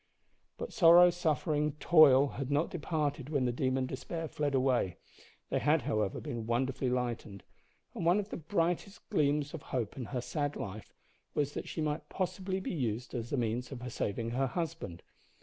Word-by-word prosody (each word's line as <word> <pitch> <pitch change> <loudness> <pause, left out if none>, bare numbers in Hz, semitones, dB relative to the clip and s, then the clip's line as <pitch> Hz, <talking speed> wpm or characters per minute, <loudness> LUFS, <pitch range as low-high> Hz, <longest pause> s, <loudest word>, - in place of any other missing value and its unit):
But - - -6
sorrow, 175 -2 +8
suffering, 155 -3 0
toil 145 -3 +6
had 135 -1 -5
not 145 +3 +1
departed 150 -4 -2
when 140 -4 +1
the 125 - +1
demon 130 +1 0
despair 160 +6 -5
fled 145 -2 -1
away. 130 -8 +1 0.5
They - - +2
had, 150 -2 +3
however, 110 -7 0
been 115 -2 -5
wonderfully 130 +2 0
lightened, 120 -5 -3 0.5
and - - -4
one 175 +4 +4
of 205 0 -4
the - - -4
brightest 175 +3 -2
gleams 150 -5 +1
of 165 - -6
hope 120 -7 -3
in 130 - -5
her 125 +2 -3
sad 145 +2 -2
life 105 +2 -6 0.4
was 145 -1 0
that - - -5
she 160 - -4
might 150 0 -2
possibly 190 0 -2
be 190 - -4
used 120 -5 -2
as 120 -1 -4
the 145 - -1
means 120 +2 -1
of 125 -2 -6
saving 115 +3 -2
her 135 +3 +1
husband. 165 - -4
140 Hz, 175 wpm, -32 LUFS, 125-160 Hz, 0.5 s, sorrow